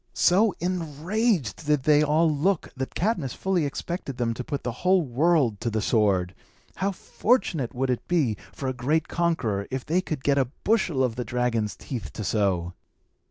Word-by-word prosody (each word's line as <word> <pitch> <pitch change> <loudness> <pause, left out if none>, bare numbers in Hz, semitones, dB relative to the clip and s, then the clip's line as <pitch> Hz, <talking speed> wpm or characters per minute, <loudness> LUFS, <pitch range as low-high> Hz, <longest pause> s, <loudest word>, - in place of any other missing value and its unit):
So 195 +3 +4
enraged 175 - -1
did 150 -3 +2
they 150 0 +5
all 155 +3 +3
look, 160 +4 0
that 130 0 -5
Cadmus 175 - -1
fully 185 -5 0
expected 140 -2 -5
them 115 -2 0
to 125 - -5
put 140 +2 -4
the 125 - -2
whole 185 -1 +4
world 135 -4 +2
to 115 - 0
the 110 0 -1
sword. 100 -5 +2 0.4
How 195 +2 0
fortunate 175 - 0
would 130 +1 0
it 125 - -3
be 150 -11 +2 0.2
for 135 - -5
a 130 - 0
great 145 +6 0
conqueror, 130 -13 0
if 130 -1 -4
he 175 +4 +2
could 155 -7 -5
get 140 -1 +3
a 130 -3 +1
bushel 185 -11 +2
of 120 -2 -1
the 125 - -1
dragon's 120 -4 -1
teeth 110 - -6
to 110 - -5
sow! 95 -5 0
140 Hz, 180 wpm, -26 LUFS, 120-170 Hz, 0.4 s, they